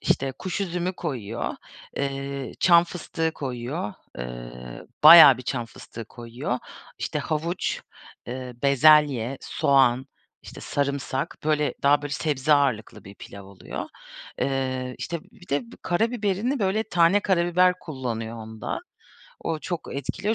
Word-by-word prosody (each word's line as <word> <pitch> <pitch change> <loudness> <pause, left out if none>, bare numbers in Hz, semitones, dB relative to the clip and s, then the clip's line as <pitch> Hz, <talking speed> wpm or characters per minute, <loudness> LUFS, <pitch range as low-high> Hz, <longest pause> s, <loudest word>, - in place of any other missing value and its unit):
İşte, 135 0 0
kuş 185 +1 -3
üzümü 180 -1 -2
koyuyor, 120 - -4 0.4
eee, 140 -2 -3
çam 170 -1 +6
fıstığı 165 -2 -3
koyuyor, 125 -4 -4 0.2
eee, - - -8 0.2
bayağı 155 -4 +11
bir - - -7
çam 120 -2 -3
fıstığı 115 +1 -10
koyuyor. 120 +3 -5 0.4
İşte, - - -2
havuç, 165 +3 -2 0.5
eee, 125 0 -6
bezelye, 140 -3 +4
soğan, 130 -2 +2 0.4
işte, - - -11
sarımsak, 140 -1 -2
böyle, 150 -1 +1
daha, 145 +1 +4
böyle, 145 -1 -5
sebze 150 -1 +1
ağırlıklı 135 -7 +1
bir 100 - -11
pilav 100 0 -11
oluyor. 100 -1 -7 0.5
Eee, 130 -2 -2
işte, 170 -1 -4
bir 180 - -18
de 140 +1 +1
b - - -12
karabiberini, 225 +5 0
böyle, 200 +1 +1
tane 175 0 +3
karabiber 180 -1 +3
kullanıyor 115 -6 -5
onda. 110 -1 -5 0.6
O 160 -1 -2
çok 170 +1 -5
etkiliyor 170 - -2
140 Hz, 125 wpm, -25 LUFS, 120-170 Hz, 0.6 s, bayağı